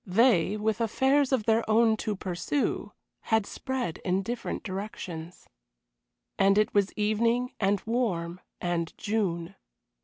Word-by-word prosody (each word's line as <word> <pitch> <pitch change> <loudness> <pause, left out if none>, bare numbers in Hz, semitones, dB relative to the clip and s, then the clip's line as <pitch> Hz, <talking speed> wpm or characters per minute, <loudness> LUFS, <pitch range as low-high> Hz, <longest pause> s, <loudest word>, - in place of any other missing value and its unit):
They, 205 -1 +3
with 220 +2 -1
affairs 265 +5 +2
of 260 -5 +2
their 225 0 +3
own 220 0 +5
to 215 -1 -2
pursue, 185 - -2 0.3
had 220 -2 +2
spread 260 -10 -4
in 185 +2 0
different 240 +5 -4
directions. 185 -4 -6 0.9
And 195 0 +5
it 215 - +2
was 200 -1 +2
evening, 230 +4 +1
and 200 -1 +2
warm, 185 -7 -1 0.2
and 170 -2 -2
June. 190 -6 -1
210 Hz, 125 wpm, -28 LUFS, 185-230 Hz, 0.9 s, own